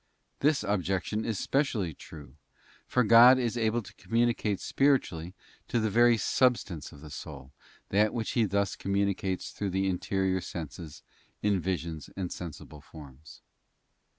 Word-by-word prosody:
This 145 -4 +2
objection 100 +1 -1
is 110 -3 -2
specially 115 - 0
true, 75 -4 -12 0.5
for 125 - +2
God 115 +3 +8
is 120 -2 -1
able 115 0 0
to - - -13
communicate 115 0 0
spiritually 100 - 0 0.3
to 120 - 0
the 110 -1 0
very 120 +2 +5
substance 105 - 0
of 75 -3 -14
the 75 -1 -11
soul 70 -2 -9 0.4
that 105 +2 +3
which 115 -2 -3
He 115 -3 +2
thus 100 -1 0
communicates 100 -1 -1
through 100 - -3
the 95 +1 0
interior 95 0 0
senses 80 -2 -8 0.4
in 100 -2 +2
visions 85 -4 -4
and 90 -2 -3
sensible 75 -3 -8
forms. 75 -1 -14
100 Hz, 140 wpm, -29 LUFS, 85-115 Hz, 0.5 s, God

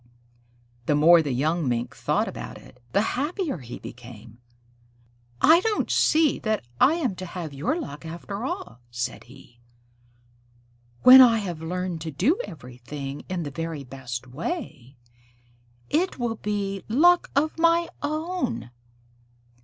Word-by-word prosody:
The 150 - +3
more 165 +3 +7
the 145 -3 -2
young 150 +3 0
Mink 120 0 -2
thought - - 0
about - - -7
it, 125 - -17
the 200 - +2
happier 295 - -2
he 120 -2 -8
became. 115 -2 -12 1.0
"I 325 +2 +7
don't 425 +3 -1
see 310 -2 +3
that 215 - -1
I 305 - +5
am 275 - -1
to 185 - -6
have 170 -4 -6
your 160 - -1
luck 150 - -7
after 175 +6 -6
all," 125 - -5
said 120 +1 -4
he. 120 -1 -17 1.4
"When 260 +1 +11
I 235 -3 +7
have 180 -7 -4
learned 180 0 -3
to 160 - -4
do 245 - +1
everything 135 -1 -8
in 180 -2 -2
the 145 - -5
very 165 0 -5
best 125 -2 -7
way, 135 - -6 0.9
it 350 +5 0
will 235 -3 -2
be 200 -2 -3
luck 345 +9 +4
of 310 +3 +1
my 335 +1 +4
own." 310 - -3
175 Hz, 135 wpm, -25 LUFS, -, 1.4 s, When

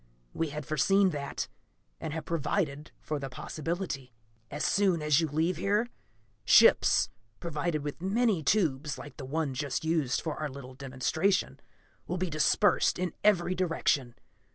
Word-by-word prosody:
We 165 - -1
had 150 0 -6
foreseen 190 +7 +3
that, 140 -2 -4 0.5
and 160 - -4
have 160 +1 -5
provided 150 -2 -2
for 150 -1 -3
the 135 -1 -5
possibility. 155 -1 -4 0.4
"As 145 - -3
soon 190 -3 +2
as 150 -1 +3
you 165 - +1
leave 160 +4 0
here, 205 +5 +1 0.6
ships, - - +5 0.3
provided 155 -2 -2
with 145 +2 -5
many 205 -1 +1
tubes 150 -4 +1
like 145 -2 -10
the 135 - -7
one 145 0 -2
just 145 +3 -3
used 160 -6 +1
for 160 -3 -4
our 155 -1 -2
little 130 -1 -9
demonstration, 140 +8 -1 0.5
will 180 - -2
be 185 -1 -2
dispersed 150 -1 +3
in 180 -1 -2
every 185 -4 +3
direction. 160 -8 0
155 Hz, 150 wpm, -29 LUFS, 140-180 Hz, 0.6 s, ships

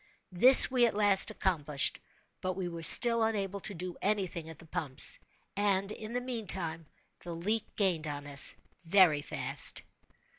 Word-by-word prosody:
This 255 +9 +8
we 245 -2 0
at 220 - -7
last 205 -2 0
accomplished—but 155 +2 -6
we 185 -1 -8
were 170 -1 -10
still 230 +7 +8
unable 200 -3 -5
to 200 - -8
do 180 +1 -10
any 205 -1 -3
thing 165 -2 -11
at 160 - -13
the 165 - -18
pumps; 155 -5 -2 0.4
and, 200 0 -3
in 215 +1 -11
the 245 - -5
meantime, 190 - -6 0.3
the 170 -1 -11
leak 210 +6 -6
gained 175 -6 -4
on 145 -1 -9
us 140 -1 +2 0.3
very 165 -4 +1
fast. - - -4
185 Hz, 155 wpm, -27 LUFS, 165-210 Hz, 0.4 s, This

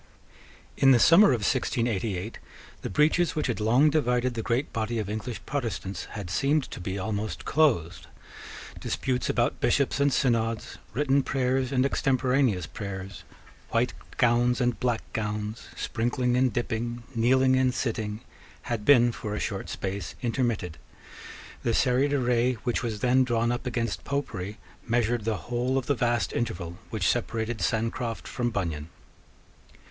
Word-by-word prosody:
In 135 - +5
the - - +6
summer 170 - +7
of 125 -5 +2
1688 110 -5 -1 0.4
the - - -4
breaches 155 - +2
which 155 - 0
had 120 -4 -1
long 125 +8 +4
divided 125 -4 +1
the 115 - -3
great 120 +5 -1
body 115 +1 -1
of 105 -2 -2
English 110 +3 -4
Protestants 115 -8 -3
had 100 -5 -5
seemed 140 - +2
to - - -7
be 95 +2 -4
almost 100 -2 -3
closed. 125 - +1 0.7
Disputes 125 -2 -1
about - - +1
Bishops 140 -1 +2
and 140 0 +3
Synods, 115 -4 0
written 140 +2 +2
prayers 130 0 0
and 130 -1 +2
extemporaneous 130 - +1
prayers, 95 -1 -7 0.5
white - - +1 0.2
gowns 120 +1 +3
and 125 -2 0
black 120 -2 0
gowns, 105 0 -3
sprinkling 120 +2 0
and 130 0 +3
dipping, 120 -1 -3
kneeling 130 +3 +4
and 130 -1 +3
sitting, 110 -3 -3 0.4
had 115 -3 -3
been 120 -2 +6
for 105 -2 -5
a - - -2
short 100 -3 -3
space 100 +1 -4
intermitted. 115 - -1 0.8
The 115 -2 0
serried 130 +2 +2
array 125 -2 +2
which 120 - 0
was 110 -4 -3
then 130 +1 +4
drawn 120 -1 +1
up 120 +1 -3
against 115 -8 -2
Popery 105 -8 -3 0.3
measured 115 -1 +1
the 110 -2 0
whole 125 +2 0
of 130 - -1
the 145 - +2
vast 120 -2 0
interval 85 -7 -3
which - - -1
separated 110 -1 -1
Sancroft 115 +5 -1
from 120 -1 -1
Bunyan. 85 -8 -3
120 Hz, 145 wpm, -27 LUFS, 110-130 Hz, 0.8 s, summer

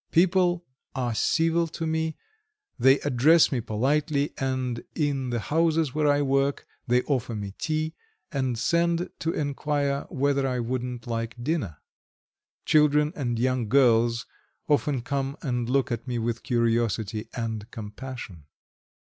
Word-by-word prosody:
People 175 0 +3 0.3
are 125 -3 -1
civil 165 +8 +2
to 165 +1 -5
me, 160 0 -1 0.6
they 135 +1 +6
address 145 +5 +4
me 130 -4 0
politely, 140 +6 0
and 130 -3 -2
in 140 -5 0
the 120 -1 -1
houses 160 +1 +1
where 150 0 +1
I 145 0 +3
work, 135 0 +1 0.2
they 125 +1 +3
offer 125 -5 -1
me 100 -2 -5
tea, 155 0 -1 0.4
and 130 -4 -1
send 170 +7 +1
to 160 +3 -1
enquire 145 -1 -1
whether 140 0 +1
I 125 -1 -1
wouldn't 125 0 -3
like 115 -1 -3
dinner. 130 - -1 0.9
Children 150 0 +4
and 120 -5 -2
young 125 -2 0
girls 120 -2 +4 0.4
often 145 -3 +1
come 140 +2 -2
and 120 -3 -1
look 135 0 +1
at 120 +2 -3
me 125 -1 -2
with 115 0 -2
curiosity 115 -2 0
and 115 -2 -4
compassion. 110 - -8
135 Hz, 135 wpm, -26 LUFS, 120-150 Hz, 0.9 s, they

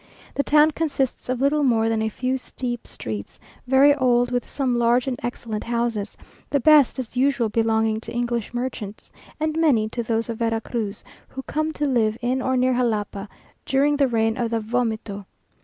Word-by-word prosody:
The - - +1
town 300 +2 +4
consists 280 -6 -2
of 255 0 -1
little 290 +2 +2
more 230 -5 +3
than 225 -1 0
a 220 - 0
few 255 +4 -2
steep 245 -2 -5
streets, 105 -2 -7 0.3
very 270 +3 +6
old, 245 -3 +2
with 245 0 -2
some 255 -4 0
large 240 +1 +3
and 265 -2 -1
excellent 225 -3 -4
houses, 235 -3 -2 0.3
the 285 - +2
best 295 -1 +5
as 255 -2 -6
usual 255 -3 +2
belonging 220 0 +1
to - - -9
English 240 -2 -2
merchants, 240 -4 -5 0.3
and 310 0 -1
many 240 -10 +3
to 240 - -3
those 230 0 -1
of 230 -2 -5
Vera 225 -1 +1
Cruz, 220 -3 -4 0.2
who 265 - -8
come 310 +3 -2
to 295 - -2
live 225 -5 +1
in 255 +1 -1
or 260 0 0
near 255 +1 +3
Jalapa, 215 -4 -1 0.3
during 280 +2 +2
the 280 -1 +3
reign 225 -2 +1
of 235 -1 0
the 230 0 0
"Vomito." 220 -3 -2
240 Hz, 185 wpm, -23 LUFS, 225-265 Hz, 0.3 s, very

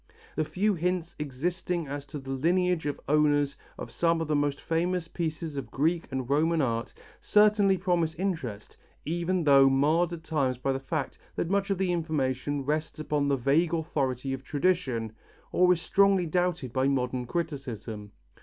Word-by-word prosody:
The 155 - +1
few 200 +7 0
hints 175 -1 -2
existing 170 +4 -2
as 145 +1 -6
to 150 - -6
the 135 -1 -7
lineage 175 +3 +1
of 145 - -3
owners 145 -1 +3 0.2
of - - -7
some 165 -1 +1
of 165 - -2
the 150 - +1
most 145 -1 0
famous 170 +1 -1
pieces 160 -3 -4
of 135 - -5
Greek 165 +4 0
and 130 -2 -3
Roman 160 +4 +2
art, 115 -5 -1 0.3
certainly 210 -2 +4
promise 175 -3 0
interest 160 - -4 0.3
even 175 +2 0
though 140 -2 +6
marred 155 +6 +2
at 170 -2 -7
times 135 -6 0
by 135 +2 -1
the 135 - -2
fact 140 +1 -4 0.2
that 170 - -2
much 200 0 +1
of 195 - +1
the 190 -1 0
information 145 -4 -1
rests 155 +2 -2
upon 150 -2 -1
the 140 -1 +2
vague 155 +7 +2
authority 135 -5 -2
of 135 0 -5
tradition, 140 - 0 0.4
or 180 0 +4
is 180 - +3
strongly 195 -1 +3
doubted 175 -6 -1
by 130 0 +2
modern 125 -2 -1
criticism. 125 -10 -4
155 Hz, 170 wpm, -28 LUFS, 135-175 Hz, 0.4 s, though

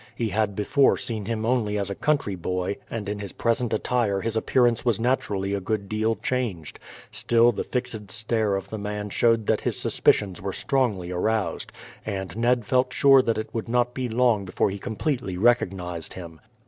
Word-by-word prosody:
He 115 -2 -1
had 105 0 0
before 120 +7 +3
seen 115 -5 -4
him 110 0 -2
only 115 -4 +1
as 100 -1 -2
a - - -1
country 140 -3 0
boy, 90 +2 -2
and 110 -3 -4
in 105 0 -3
his 100 -2 -6
present 115 0 0
attire 110 -2 0
his 115 +1 -2
appearance 120 0 +2
was 120 -5 +1
naturally 105 -5 0
a 100 - 0
good 100 0 -2
deal 110 +2 0
changed. 110 - -3 0.3
Still 120 0 +3
the 110 - -3
fixed 120 -5 -4
stare 110 -2 0
of 95 - -5
the 110 - -4
man 105 0 -4
showed 115 -1 +2
that - - +1
his - - -2
suspicions 95 -4 +1
were 95 0 -3
strongly 110 -11 0
aroused, 95 -1 -1 0.3
and 95 -4 -4
Ned 120 0 +1
felt 125 +3 +2
sure 135 0 +6
that 115 -3 0
it 110 - -5
would 115 0 -4
not 125 0 +1
be 130 -2 -3
long 115 -3 +2
before 95 +1 0
he 100 - -6
completely 120 - -3
recognized 90 -6 0
him. 85 -4 -10
110 Hz, 185 wpm, -25 LUFS, 100-120 Hz, 0.3 s, sure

